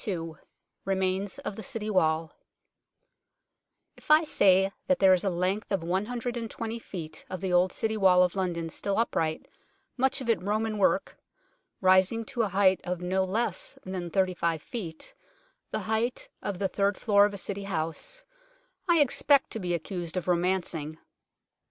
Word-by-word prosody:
II 165 -5 -3 0.5
REMAINS 190 +1 -1
OF 205 - -3
THE 220 - -7
CITY 225 -4 -3
WALL 160 -4 +1 1.6
IF - - -19
I 305 +2 +7
say 195 - +4 0.2
that 275 0 +3
there 190 -1 +6
is 180 - +1
a 195 - +1
length 185 +5 -1
of 190 -4 0
120 230 +4 -3
feet 170 -8 -7
of 185 - -5
the 185 0 -2
old 180 +1 +4
City 220 0 -1
Wall 185 -3 +5
of 180 +1 0
London 170 -4 -2
still 200 +3 -2
upright, 160 -8 -1 0.5
much 265 +2 +1
of 260 - -6
it 225 -7 +2
Roman 215 +2 -1
work, 195 - +1 0.6
rising 190 +4 +4
to 240 +1 -2
a 220 - +2
height 190 0 +3
of 180 -1 -3
no 185 +2 0
less 195 +1 -1
than 185 -2 -4
35 170 -4 0
feet 170 -9 -7 0.6
the - - -3
height 220 +3 -1
of 200 -3 -3
the 195 +1 0
third 200 +1 0
floor 205 -2 +4
of 205 - -8
a - - -6
City 200 +1 -4
house 195 - -4 0.7
I 335 -3 +5
expect 280 0 +3
to 225 - -3
be 175 -3 -1
accused 175 +1 -4
of 185 - -3
romancing. 175 -3 0
190 Hz, 160 wpm, -28 LUFS, 180-220 Hz, 1.6 s, I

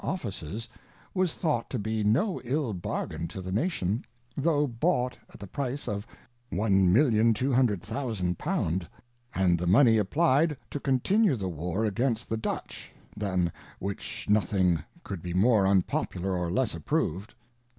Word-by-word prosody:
Offices, 110 - -4 0.5
was 185 -4 +1
thought 150 -10 -1
to 130 - -2
be 110 0 -1
no 135 - +2
ill 130 -2 -1
Bargain 85 -2 -3
to 95 - -8
the, 95 0 -5
Nation, 110 - 0 0.3
tho' 150 0 +2
bought 125 0 0 0.2
at - - -14
the 100 - -7
Price 135 +6 -3
of 105 -1 -3 0.4
1200000 110 - +2
pound, 95 - -1 0.5
and 90 -3 +3
the 90 - -2
Money 110 +3 +6
apply'd 150 - +2
to 145 - -3
continue 145 - +2
the 95 -5 -3
War 90 +6 -2
against 115 +2 0
the 110 - 0
Dutch, 110 - -5 0.2
than 95 -4 0 0.3
whicTi 100 +1 -5
nothing 95 -5 +2 0.2
could 95 -4 -6
be 90 0 -4
more 100 0 +4
unpopular 95 -1 0
or 90 -1 -1
less 120 +8 +1
approved. 85 +4 -2
110 Hz, 135 wpm, -28 LUFS, 95-130 Hz, 0.5 s, Money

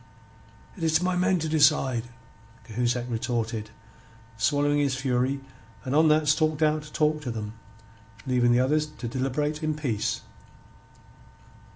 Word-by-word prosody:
"It 190 - -12
is 160 -1 +2
to 175 - -4
my 180 0 +1
men 185 +1 +2
to 160 -1 -2
decide," 145 -6 +3 0.6
Cahusac 120 +1 -1
retorted, 115 -2 -2 0.7
swallowing 145 +6 +2
his 140 -3 +1
fury, 130 +1 0 0.4
and 130 +2 -1
on 160 +1 +5
that 155 0 +3
stalked 155 0 +2
out 155 0 +2
to 150 0 -13
talk 155 -1 +1
to 135 - -5
them, 110 -2 -5 0.7
leaving 125 -2 +2
the 120 +1 +4
others 150 +4 +1
to 145 -5 -8
deliberate 135 +5 -2
in 155 -1 -1
peace. 125 -9 -2
145 Hz, 145 wpm, -26 LUFS, 120-155 Hz, 0.7 s, on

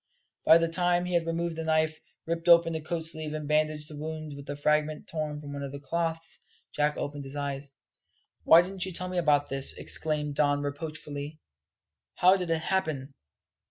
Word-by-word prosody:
By 160 - +8
the 165 0 +1
time 175 +1 +1
he 180 - -3
had 170 -1 +1
removed 170 0 -1
the 160 - -3
knife, 155 0 +1 0.3
ripped 165 +1 -2
open 170 -1 +7
the 160 - -3
coat 160 +1 -2
sleeve, 155 -2 0
and 150 -1 -5
bandaged 150 0 +1
the 155 - -6
wound 155 0 -6
with 140 0 -11
a 145 - -3
fragment 150 +1 0
torn 155 -2 -3
from 145 -1 -8
one 140 - -5
of 140 -1 -5
the 140 - -7
cloths, 165 +3 -2 0.3
Jack 150 0 +1
opened 145 0 -4
his 135 +1 -5
eyes. 140 -1 -4 0.7
"Why 165 +1 +8
didn't 190 0 -5
you 185 - -6
tell 180 +2 -4
me 180 -1 -1
about 145 -3 +2
this?" 135 0 +2
exclaimed 150 -2 -1
Don 145 0 +2
reproachfully. 145 0 -5 0.8
"How 185 +2 +6
did 180 -3 -3
it 165 -1 +1
happen?" 155 -7 -1
155 Hz, 195 wpm, -28 LUFS, 145-165 Hz, 0.8 s, By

